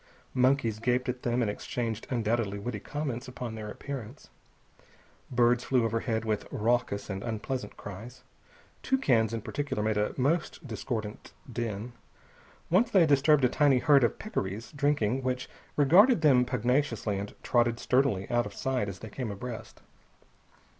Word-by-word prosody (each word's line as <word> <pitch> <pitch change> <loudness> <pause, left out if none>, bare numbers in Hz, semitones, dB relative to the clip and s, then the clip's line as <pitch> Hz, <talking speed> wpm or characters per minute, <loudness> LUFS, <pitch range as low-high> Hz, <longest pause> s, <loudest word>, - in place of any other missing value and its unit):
Monkeys 125 -4 +2
gaped 125 +2 0
at 125 0 -3
them 120 0 +1
and 105 - 0
exchanged 115 +1 -4
undoubtedly 115 -4 0
witty 105 +1 -4
comments 135 0 -4
upon 125 -2 -6
their 110 -1 -6
appearance. 135 +1 -8 1.0
Birds 120 0 +3
flew 125 -3 +2
overhead 115 0 -1
with 110 -2 -1
raucous 115 -2 0
and 95 -1 -4
unpleasant 120 +4 -4
cries. 110 +6 -9 0.6
Toucans, 125 - +2
in 115 -2 -4
particular, 145 -7 -2
made 110 -1 +1
a 105 0 0
most 150 +4 0
discordant 110 -2 -5 0.2
din. 115 0 -4 0.8
Once 215 +7 +4
they 190 -7 +5
disturbed 145 -1 +4
a - - +6
tiny 140 +1 +3
herd 140 0 +5
of 120 - +1
peccaries, 105 - -4
drinking, 140 -5 +1
which 125 0 -2 0.3
regarded 180 - +6
them 130 -5 +5
pugnaciously 120 -4 0
and 100 +1 -6
trotted 120 -1 +2
sturdily 125 -7 +1
out 120 -2 +2
of 100 - -11
sight 130 -6 -1
as 95 - -7
they 110 - -9
came 125 -1 -4
abreast. 110 +3 -7
120 Hz, 145 wpm, -29 LUFS, 110-135 Hz, 1.0 s, a